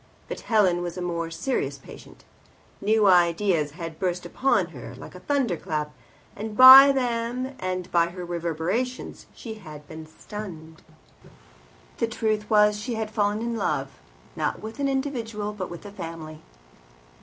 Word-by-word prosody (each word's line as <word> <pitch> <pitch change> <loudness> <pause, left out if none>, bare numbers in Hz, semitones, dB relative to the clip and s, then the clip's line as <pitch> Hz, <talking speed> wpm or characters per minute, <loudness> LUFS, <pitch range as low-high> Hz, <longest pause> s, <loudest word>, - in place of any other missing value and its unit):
But - - -6
Helen 190 -6 +2
was 175 0 -5
a - - -4
more 170 -1 -3
serious 165 +11 -2
patient. - - -14 0.6
New 215 +1 +3
ideas 175 -4 +3
had 165 -3 -7
burst 180 -1 -2
upon 210 -9 +1
her 125 -5 -10
like 130 - -11
a 180 - -10
thunder 255 -2 0
clap, 150 -1 -3 0.4
and 210 +1 -6
by 265 +2 +11
them 250 0 -2
and 185 -1 -4
by 170 -1 +3
her 180 0 -7
reverberations 175 +9 -3
she 225 - -7
had 150 -5 -11
been 160 0 -9
stunned. 160 -3 -9 1.2
The 230 - 0
truth 215 -2 -2
was 210 -1 +4
that - - -7
she 240 +1 -3
had 220 -1 -3
fallen 210 0 0
in 235 0 -2
love, - - -1 0.5
not - - -2
with 220 +4 -9
an 280 - +1
individual, 230 -7 -3
but 190 -3 -5
with 170 +3 -9
a 205 - -8
family. 165 -4 -8
200 Hz, 155 wpm, -25 LUFS, 170-225 Hz, 1.2 s, by